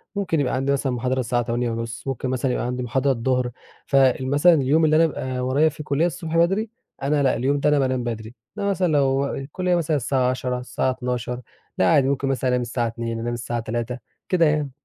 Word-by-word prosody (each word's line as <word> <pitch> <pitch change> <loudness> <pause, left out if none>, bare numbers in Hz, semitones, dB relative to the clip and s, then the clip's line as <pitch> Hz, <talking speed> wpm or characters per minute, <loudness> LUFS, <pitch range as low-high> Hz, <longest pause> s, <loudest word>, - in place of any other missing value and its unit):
ممكن 180 -6 0
يبقى 135 -3 0
عندي 135 +2 0
مثلًا 135 -1 0
محاضرة 125 +2 -1
الساعة 120 0 0
08:30 115 +1 -3
ممكن 130 -1 -2
مثلًا 130 0 0
يبقى - - -1
عندي 125 +1 -2
محاضرة 130 +3 +1
الضهر. 125 0 0 0.3
فال 130 -1 +3
مثلًا 145 +5 +5
اليوم 155 +2 +3
اللي 155 0 +3
أنا 165 +1 +6
بابقى 130 -4 -4
ورايا 135 +5 +2
فيه 150 +1 -9
كلية 150 +3 +1
الصبح 165 -2 -2
بدري، 195 +6 +2 0.3
أنا 145 +1 +2
لأ 135 - +3
اليوم 140 +3 0
ده 150 - +2
أنا 150 - +3
بانام 130 -2 0
بدري، 115 0 -5 0.2
إنما 200 -1 0
مثلًا 190 -2 +1
لو 135 -2 +2
الكلية 175 +7 -1
مثلًا 160 -3 +1
الساعة 130 -1 +1
10:00 125 -1 -2
الساعة 130 +1 -1
12:00 125 -1 -3 0.4
لأ 95 - +3
عادي 135 -2 +4
ممكن 140 0 0
مثلًا 130 -1 0
أنام 125 0 +1
الساعة 120 0 -1
02:00 115 0 -4
أنام 120 +1 -2
الساعة 120 0 -3
03:00 120 +2 -3 0.3
كده 175 -3 +4
يعني. 150 -2 +1
130 Hz, 210 wpm, -23 LUFS, 125-150 Hz, 0.4 s, أنا